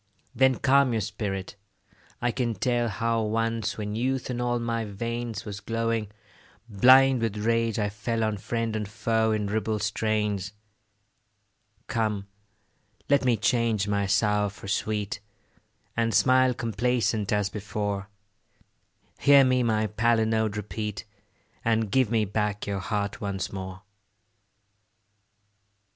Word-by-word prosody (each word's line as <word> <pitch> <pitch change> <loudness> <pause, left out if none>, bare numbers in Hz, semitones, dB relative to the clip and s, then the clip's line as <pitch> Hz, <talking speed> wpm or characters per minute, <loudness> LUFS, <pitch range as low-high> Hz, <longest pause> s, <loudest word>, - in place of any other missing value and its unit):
Then 130 0 +4
calm 135 -1 +3
your 110 - 0
spirit; 100 -1 -4 0.7
I 120 - +2
can 120 -2 -1
tell 120 +3 0
How 115 +3 0
once, 115 +1 -1
when 105 -1 -4
youth 130 +3 -1
in 120 0 -3
all 120 0 0
my 115 -1 -2
veins 115 +1 -4
Was 100 -2 -6
glowing, 115 -1 -1 0.6
blind 130 +4 +6
with 110 -2 -1
rage, 115 +1 +1
I 105 -2 0
fell 115 +2 -2
On 110 -1 0
friend 115 +2 -2
and 105 -2 -2
foe 110 +1 +1
in 105 -1 0
ribald 105 0 -1
strains. 105 -2 -1 1.3
Come, 110 -4 -1 0.9
let 140 -1 +4
me 120 -3 +3
change 115 -2 +1
my 100 -1 0
sour 105 0 +2
for 100 0 -11
sweet, 105 0 -2 0.8
And 115 -1 +1
smile 130 -1 +4
complacent 115 -2 0
as 105 -2 +1
before: 105 -1 -3 1.1
Hear 140 -1 +7
me 130 -1 +3
my 110 -2 +1
palinode 110 -1 +1
repeat, 105 +1 -4 0.6
And 110 -2 +1
give 130 -3 +3
me 110 -2 +2
back 105 0 -2
your 100 -1 -2
heart 100 +1 -3
once 100 -2 -3
more. 95 +1 -7
110 Hz, 125 wpm, -26 LUFS, 105-115 Hz, 1.3 s, Hear